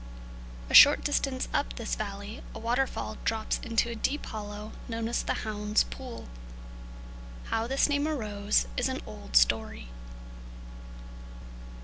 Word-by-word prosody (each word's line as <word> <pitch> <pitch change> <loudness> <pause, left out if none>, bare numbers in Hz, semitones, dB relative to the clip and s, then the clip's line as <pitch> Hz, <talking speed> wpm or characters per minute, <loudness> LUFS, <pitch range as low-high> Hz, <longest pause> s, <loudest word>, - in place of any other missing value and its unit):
A - - -6
short 285 - +9
distance 275 -3 0
up 285 - 0
this 230 -3 -4
valley 205 +1 -5
a - - -4
waterfall 245 +4 -1
drops 220 -1 -1
into 230 -1 +1
a 235 - -4
deep 275 +6 -2
hollow 210 0 -7 0.2
known 230 -1 -3
as 235 - 0
the - - -1
"Hound's 210 0 +1
Pool." 255 -3 -8 1.2
How 225 +1 0
this 270 +2 +2
name 290 0 +1
arose 210 - 0
is - - +1
an - - -3
old 65 -2 -9
story. - - +3
225 Hz, 130 wpm, -29 LUFS, 210-260 Hz, 1.2 s, short